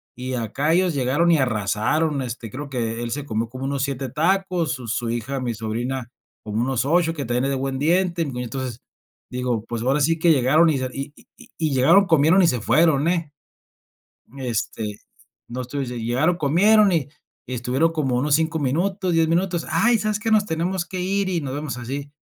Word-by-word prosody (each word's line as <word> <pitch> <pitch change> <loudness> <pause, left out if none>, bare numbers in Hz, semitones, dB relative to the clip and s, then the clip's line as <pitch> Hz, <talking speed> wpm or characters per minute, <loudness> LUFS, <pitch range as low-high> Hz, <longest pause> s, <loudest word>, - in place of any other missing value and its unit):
y 130 +1 -5
acá 130 +6 -1
ellos 180 0 +2
llegaron 140 +5 +2
y 165 - +5
arrasaron. 130 +5 0
Este, 120 -3 -6
creo 140 +4 -6
que 115 -3 -3
él 120 -1 -4
se 145 +1 -3
comió 115 -3 -2
como 130 +1 -8
unos 135 0 -1
7 135 -1 -3
tacos, 175 +2 0
su 125 -5 -7
su 115 +1 -2
hija, 120 +4 -3
mi 125 -2 -2
sobrina, 120 +3 -3 0.3
como 110 +1 -2
unos 130 0 0
8 165 +2 +2
que 140 -3 -4
también 120 +2 0
es 140 - 0
de - - 0
buen 135 0 -3
diente, 170 +3 +1
y - - -3
como 130 -4 -5
entonces, 125 0 -5 0.5
digo, 125 -3 -2
pues 115 -1 -4
ahora 135 +5 +1
sí 165 +3 +2
que 170 0 +4
llegaron 150 +4 +4
y 150 - +1
se 130 -1 -2
y 140 +1 -6
y - - -19
y 155 -3 0
llegaron, 135 +10 +5
comieron 165 +2 +4
y - - +5
se 125 -7 0
fueron, 150 +5 +3
eh, 170 -4 0 1.1
este, 110 -4 -3 0.5
no 125 +2 -5
estuviesen, 125 -1 -4
llegaron, 130 +10 +1
comieron 200 +8 +4
y 160 -7 0 0.4
y 130 - -4
estuvieron 130 +7 +1
como 140 -6 0
unos 145 +3 +2
5 160 +1 0
minutos, 180 +7 0
10 165 -1 +3
minutos. 175 +1 0
Ay, 235 +1 +3
¿sabes 215 -1 -1
qué? 225 +1 -2
Nos 215 -2 +4
tenemos 175 +1 -2
que 185 0 -5
ir 195 +1 0
y 175 -3 -1
nos 135 -2 -4
vemos 145 -4 -4
así. 140 +4 -5
140 Hz, 200 wpm, -22 LUFS, 125-165 Hz, 1.1 s, y